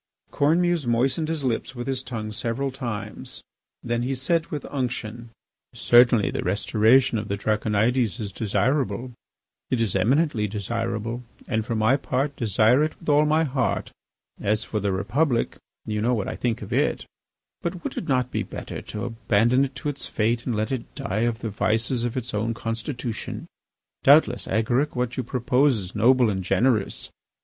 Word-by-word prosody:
Cornemuse 165 0 +2
moistened 130 +7 +1
his 160 -3 -2
lips 130 +1 -2
with 120 0 -5
his 130 -1 -2
tongue 110 -4 -5
several 120 +5 -2
times. 110 -6 -6 0.4
Then 120 0 -1
he 130 +2 -1
said 165 +6 0
with 150 -3 -5
unction: 120 -3 -3 0.5
"Certainly 120 -3 +5
the - - -2
restoration 110 +5 +3
of 105 - -5
the 100 - -2
Draconides 110 +3 +1
is 105 -3 -4
desirable; 120 +5 0 0.6
it 130 - +1
is 110 -5 0
eminently 120 - +2
desirable; 115 +3 -3 0.3
and 110 -2 0
for 115 +1 -3
my 110 +5 +3
part, 140 +1 -1
desire 115 +4 +3
it 155 - -3
with 165 - -6
all 150 +1 +5
my 155 +2 +3
heart. 130 -5 -1 0.5
As 105 +1 0
for 110 - -2
the 100 -1 0
Republic, 120 +7 0 0.3
you 105 -1 -2
know 120 +3 +2
what 105 - -2
I - - -3
think 115 -2 -2
of 100 - -6
it.... - - +1 0.6
But 170 0 -4
would - - -4
it 175 - -4
not 125 -3 +1
be - - -1
better - - -6
to 105 - -5
abandon 120 +2 +2
it 135 0 -8
to 130 +3 -3
its 140 -1 -5
fate 115 +2 0
and 120 - 0
let 110 +2 -1
it 130 -3 -4
die 110 +5 0
of 115 +1 -6
the 110 - -3
vices 110 +5 0
of 120 +1 -3
its 125 -1 -4
own 110 +2 -1
constitution? 115 +1 -4 0.6
Doubtless, - - +5
Agaric, 120 +7 +1
what 125 -1 -1
you - - -1
propose 125 +2 +2
is 95 -2 -6
noble 120 +1 +4
and 95 -1 -3
generous. 105 +3 +1
120 Hz, 175 wpm, -24 LUFS, 110-130 Hz, 0.6 s, Certainly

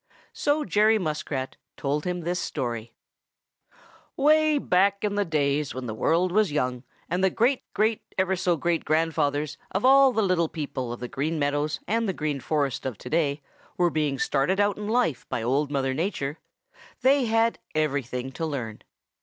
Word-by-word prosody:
So 295 +1 0
Jerry 215 +4 +4
Muskrat 150 -6 -3 0.2
told 145 +2 -1
him 180 -1 -2
this 175 +2 -2
story: 120 -5 -3 1.3
"Way 305 +1 +4
back 200 -4 +2
in 210 -1 0
the 205 0 +1
days 150 -4 0
when 130 -1 -5
the 110 - -4
world 170 +10 +1
was 210 -2 +2
young, 125 -4 -1 0.2
and 180 +2 -1
the 190 - +5
great 245 +7 +1
great 215 +1 +2 0.2
ever 190 0 +2
so 175 -2 +1
great 170 +2 0
grandfathers 150 -2 0
of 195 +5 -1
all 270 0 +7
the 220 -3 +1
little 180 -4 +2
people 140 -6 -4
of 120 - -7
the 125 - -3
Green 155 +4 -2
Meadows 145 +1 0
and 225 0 0
the - - 0
Green 150 -4 -2
Forest 140 -2 -1
of 125 -6 -5
today 145 +1 -1 0.3
were 175 -2 +3
being 150 -3 0
started 145 +9 +1
out 205 0 +3
in 210 0 -6
life 220 - 0
by 115 - -2
Old 140 +5 +1
Mother 135 -2 0
Nature, 150 -2 -2 0.6
they 270 0 +4
had 225 0 +2 0.2
everything 135 -4 -1
to 165 - -6
learn. 120 -8 -5
160 Hz, 170 wpm, -26 LUFS, 140-205 Hz, 1.3 s, all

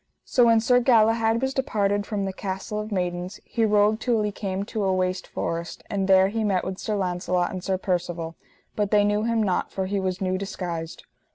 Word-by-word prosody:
So 245 - +4
when 230 -1 +5
Sir 245 +2 +4
Galahad 225 -1 +3
was 265 0 0
departed 205 -6 0
from 205 -3 -2
the 190 - -3
Castle 195 +2 -4
of 215 +1 -5
Maidens 180 0 -3
he 230 - -1
rode 210 +1 +3
till 235 -4 +1
he 210 - -1
came 195 -1 -3
to 215 0 -3
a 190 - +2
waste 185 0 -1
forest, 165 0 -4
and 195 -2 0
there 190 0 +5
he 225 +2 -2
met 195 -4 +1
with 190 0 -5
Sir 215 - -2
Launcelot 180 -1 0
and 185 -2 -6
Sir 190 -1 0
Percivale, 175 -3 -2 0.4
but 205 -2 0
they 210 -1 +4
knew 205 +1 +1
him 230 -1 +1
not, 185 -3 0
for 190 - -2
he 200 +1 -1
was 185 -1 -2
new 185 -1 -1
disguised. 170 -4 -5
200 Hz, 210 wpm, -25 LUFS, 185-215 Hz, 0.4 s, when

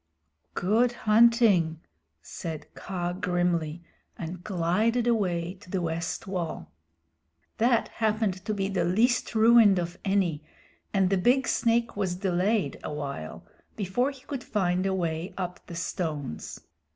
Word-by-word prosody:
"Good 230 +6 +2
hunting," 215 -8 +4 0.4
said 160 -3 -6
Kaa 175 -2 -4
grimly, 175 -3 -1 0.3
and 170 +2 -6
glided 215 +6 +1
away 180 -7 0
to 195 - -15
the 190 - -1
west 170 0 -3
wall. 180 -4 -4 0.9
That 235 +1 +3
happened 215 -4 -1
to - - -1
be 195 -1 -1
the 190 -3 0
least 225 +8 +2
ruined 220 -3 +6
of 175 0 -3
any, 190 -6 +1 0.5
and 195 -2 +2
the 195 - +3
big 250 +7 +3
snake 235 0 +1
was 190 -3 -1
delayed 190 +3 0
awhile 140 - -5 0.3
before 215 +7 0
he 275 -2 -11
could 275 -2 -6
find 185 -2 0
a 190 - 0
way 170 0 -3
up 180 -1 -4
the 170 - -8
stones. 155 - -4
185 Hz, 130 wpm, -27 LUFS, 175-220 Hz, 0.9 s, ruined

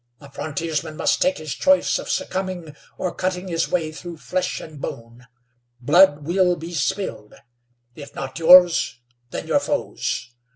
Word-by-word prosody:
A 140 -1 -14
frontiersman 155 +1 -4
must - - +1
take 275 0 +2
his 155 -2 -5
choice 280 0 +2
of - - -8
succumbing 185 -5 -3 0.2
or 180 - -2
cutting 185 0 -3
his 165 -1 -1
way 165 -3 -1
through 170 +1 -9
flesh 180 +7 -2
and 155 -3 -11
bone. 115 +2 -8 0.5
Blood 145 +3 +5
will 180 +1 +2
be 165 +1 -8
spilled; 155 - -3 0.6
if 145 +1 -11
not 135 +2 -6
yours, 170 -7 +6 0.3
then - - -5
your - - +2
foe's. 125 -1 -3
165 Hz, 150 wpm, -22 LUFS, 145-180 Hz, 0.6 s, yours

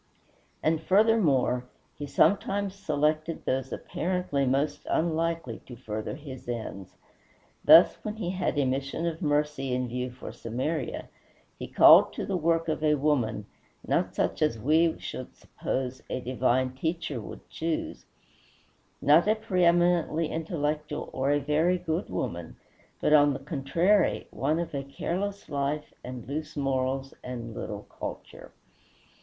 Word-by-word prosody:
And, 160 0 +2
furthermore, 165 - +3 0.3
he 145 - -6
sometimes 195 +6 +2
selected 155 -3 -1
those 130 0 -1
apparently 175 -6 -1
most 140 +3 0
unlikely 165 -6 0
to 125 - -9
further 110 -3 -5
his 135 -5 -9
ends. 110 -5 -5 0.7
Thus, - - +8
when 215 0 -4
he 190 -5 -3
had 185 -4 -1
a 140 - +3
mission 135 +5 -2
of 170 +1 -3
mercy 145 -4 0
in 125 0 -1
view 125 +1 -3
for 125 +1 -9
Samaria, 130 +5 -3 0.5
he - - -5
called - - +7
to - - -4
the 195 - -2
work 165 -1 +1
a 155 -1 +2
woman; 135 -8 0 0.4
not - - 0
such - - -1
as 150 -7 +2
we 160 +7 +3
should 130 - -7
suppose 130 0 -4
a - - -2
divine 130 +1 +1
teacher 155 -2 -3
would - - -10
choose, 165 0 -4 1.0
not 155 +7 +6
a 215 - +4
preëminently 175 -5 +2
intellectual 150 -2 -3
or 135 +1 0
a 145 0 +3
very 155 +5 +2
good 175 +1 -3
woman, 85 -1 -4 0.5
but, 150 - +3
on 145 -1 +6
the 135 - -5
contrary, 165 +8 +1
one 150 +4 0
of 170 -2 -4
a 140 - -2
careless 195 +8 -4
life, 145 +1 -2
and 125 -2 -7
loose 150 +2 -5
morals, 135 -1 -1
and 120 -2 -6
little 105 -1 -6
culture. - - -8
150 Hz, 140 wpm, -28 LUFS, 130-165 Hz, 1.0 s, Thus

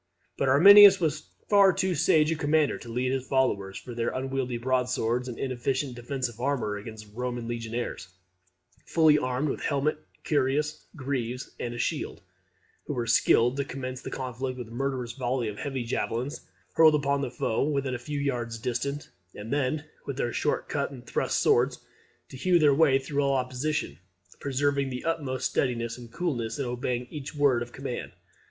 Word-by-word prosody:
But 135 - 0
Arminius 195 +7 +9
was 155 -3 -2 0.2
far 200 -2 +6
too 185 0 0
sage 155 0 +3
a - - +1
commander 150 0 +1
to 120 - -10
lead 125 +2 -1
on 135 - +1
his 130 - -14
followers, 100 -8 0
with 120 -2 -8
their 115 - 0
unwieldy 130 -2 -2
broadswords 125 -1 0
and 120 - -6
inefficient 130 +1 -2
defensive 120 -1 -4
armour, 125 -5 -1
against 110 +1 -8
the 105 - -20
Roman 120 -2 -3
legionaries, 115 -3 -4 0.8
fully 155 -2 +4
armed 130 +2 -1
with - - -3
helmet, 150 +1 0 0.3
cuirass, 150 +1 0
greaves, 130 -3 -3
and 120 0 -4
shield; - - -3 0.6
who 145 - -3
were 120 -2 -1
skilled 120 +2 +3
to 140 - +1
commence 130 -1 -6
the - - -6
conflict 130 0 -4
with 120 -3 -7
a - - -14
murderous 130 -1 -2
volley 125 -1 -2
of 105 -1 -6
heavy 135 -3 -3
javelins, 120 +4 -3 0.3
hurled 160 -1 +6
upon 140 -1 +1
the 135 - -2
foe 120 -2 -1
when 140 -1 0
a 125 - -3
few 145 +4 -4
yards 120 -5 -2
distant, 130 +5 -3 0.2
and 110 +4 -5
then, 145 +2 0 0.2
with 140 - -4
their 120 -3 -1
short 150 - -1
cut 140 -1 -1
and 130 -3 -11
thrust - - 0
swords, - - +3 0.5
to 130 - -10
hew 180 +6 +3
their 150 -4 +5
way 140 -2 +5
through 140 +1 -2
all 140 0 +2
opposition; 130 - -2 0.4
preserving 140 0 0
the 125 -1 -5
utmost 145 -6 -1
steadiness 115 -3 -1
and 120 -2 -11
coolness, 125 -8 -2
and 140 - -2
obeying 125 0 -2
each 150 0 -7
word 140 -5 +3
of 120 0 -5
command. 135 -1 -6
130 Hz, 175 wpm, -27 LUFS, 120-145 Hz, 0.8 s, Arminius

